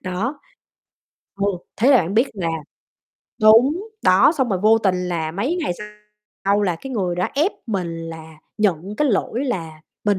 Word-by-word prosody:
đó. 195 +10 -3 1.0
Ừ, 200 0 0 0.3
thế 245 +7 +4
là 275 - +7
bạn 185 +1 -2
biết 235 +5 +4
là 180 -5 -2 0.9
đúng, 265 - +5
đó, 185 +10 +5
xong 265 -4 +1
rồi 190 -4 0
vô 220 +2 +5
tình 190 -4 +1
là 160 -3 -2
mấy 255 - -1
ngày 300 - -1 0.7
sau 200 +1 +2
là 180 -4 0
cái 265 +8 -8
người 185 -6 -1
đó 180 - 0
ép 310 +8 +2
mình 195 -6 -2 0.2
là 160 -1 -10 0.2
nhận 195 -1 0
cái 300 - +2
lỗi 235 +3 0
là 165 - -4 0.2
mình 205 -2 +2
200 Hz, 170 wpm, -21 LUFS, 180-245 Hz, 1.0 s, là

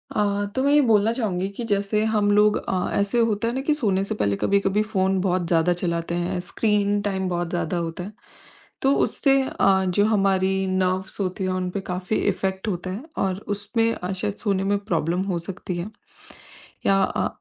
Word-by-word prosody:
अ, 205 -1 +1
तो 260 - +1
मैं 280 - +3
ये 295 - +6
बोलना 220 -3 +3
चाहूँगी 195 -6 -1
कि 240 - -3
जैसे 205 +1 +1
हम 205 -1 +2
लोग 210 +1 +4
अ, 185 -1 -2
ऐसे 200 +4 +1
होता 230 -1 +1
है 235 - -1
ना 265 - -2
कि 300 +2 +1
सोने 200 -10 +1
से 200 - -3
पहले 100 -1 0
कभी-कभी 200 +1 +2
फोन 190 0 +2
बहुत 180 -2 0
ज़्यादा 170 +1 +3
चलाते 170 -1 -2
हैं, 175 +1 -1
स्क्रीन 205 -2 +1
टाइम 190 -2 -1
बहुत 175 -1 -2
ज़्यादा 175 0 -2
होता 170 +1 -3
है। 205 +4 -8 0.7
तो 270 +1 +3
उससे 275 -1 +2
अ, 190 -1 +2
जो 205 +3 +2
हमारी 195 -3 +2
नर्वस 185 0 -1
होती 190 0 -2
हैं, 185 - 0
उन 185 0 -2
पे 195 +2 -4
काफ़ी 185 +4 -2 0.2
इफ़ेक्ट 190 +2 -3
होता 185 -2 -3
है 200 +7 -5
और 190 -1 0 0.2
उसमें 225 +3 0
अ, 180 +2 -5
शायद 195 +2 -3
सोने 195 -3 -1
में 200 +1 +1
प्रॉब्लम 175 -3 -1
हो 170 - -1
सकती 180 0 -6
है। 175 +4 -4 1.0
या 195 0 +4
अ, - - 0
195 Hz, 195 wpm, -23 LUFS, 180-210 Hz, 1.0 s, ये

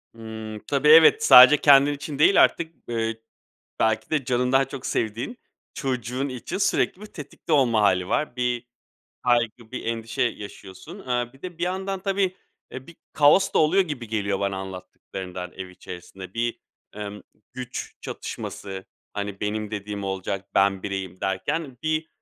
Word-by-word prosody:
Hımm. 110 -1 -7
Tabii, 145 +1 +1
evet, 160 +1 +8
sadece 130 +4 +10
kendin 145 0 +6
için 145 0 -6
değil 195 +6 +7
artık 165 -1 -1
b 120 - -5
eee, 115 0 -2 0.6
belki 110 0 +1
de 150 -4 0
canından 125 +2 +2
çok 135 -1 -8
sevdiğin 115 - -2 0.4
çocuğun 130 - -2
için 130 +8 -5
sürekli 195 -1 +1
bir 215 - -7
tetikte 160 -2 -8
olma 120 -7 +4
hâli 95 -3 +2
var. 150 -4 -1
Bir 125 -1 -1 0.6
kaygı, 120 -2 +1
bir - - -5
endişe 115 -1 -2
yaşıyorsun. 105 - -6
Iıı, 125 -6 -2
bir 135 - -21
de 180 -2 -7
bir 170 - -6
yandan 190 +1 -2
tabii, 195 -1 0 0.3
eee, 130 0 -8
bir 170 - -14 0.2
kaos 155 +6 +5
da - - +4
oluyor 165 +5 +4
gibi 145 -10 -6
geliyor 100 -3 -1
bana 100 -1 -1
anlattıklarından 95 -1 -7
ev 95 -1 -7
içerisinde. 90 +1 -10
Bir, 120 0 -1 0.4
emm, 105 0 -6 0.3
güç 125 -1 -6
çatışması, 95 -1 -6 0.3
hani, 100 -1 -5
"Benim 105 0 -2
dediğim 105 -1 -5
olacak. 95 0 -4
Ben 95 -1 +3
bireyim." 95 -2 -5
derken. 125 +8 -2
Bir 155 0 -1
120 Hz, 155 wpm, -24 LUFS, 100-145 Hz, 0.6 s, sadece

